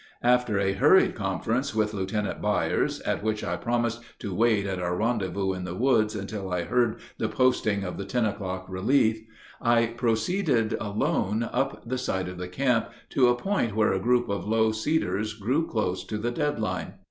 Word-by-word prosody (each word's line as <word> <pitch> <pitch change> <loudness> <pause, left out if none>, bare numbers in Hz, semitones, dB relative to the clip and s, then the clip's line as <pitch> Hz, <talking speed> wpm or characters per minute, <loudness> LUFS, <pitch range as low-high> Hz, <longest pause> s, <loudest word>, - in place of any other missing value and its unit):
After 125 -3 +3
a 100 -1 +1
hurried 150 - +5
conference 110 +6 -2
with 110 -1 +1
Lieutenant 100 +1 -2
Byers, - - 0
at - - -1
which 110 0 -1
I - - -1
promised 120 -1 -1 0.2
to 100 -4 -5
wait 110 0 +2
at 95 -2 -2
our 90 0 -1
rendezvous 100 -4 0
in 90 -1 -5
the 90 -1 -5
woods 115 -2 +2
until 100 -1 -5
I 90 -1 0
heard 120 +3 +1 0.2
the 110 - 0
posting 110 -6 +2
of 90 0 -5
the 100 - -4
ten 120 +3 0
o'clock 95 -3 -3
relief, 110 +4 +2 0.4
I 120 -1 +4
proceeded 115 - 0
alone 105 +1 0
up 135 +1 -2
the 130 +1 -2
side 95 -7 -2
of 90 -1 -8
the 90 - -4
camp 125 +4 +1 0.2
to 130 -2 +4
a 120 - +4
point 120 - -1
where 110 -2 +3
a 95 - 0
group 120 +4 +2
of 100 0 -3
low 110 0 +3
cedars 110 - -1
grew 130 +10 0
close 95 -5 -1
to 105 - -4
the 115 +3 -2
dead 145 0 -1
line. 110 - -3
110 Hz, 185 wpm, -27 LUFS, 100-120 Hz, 0.4 s, hurried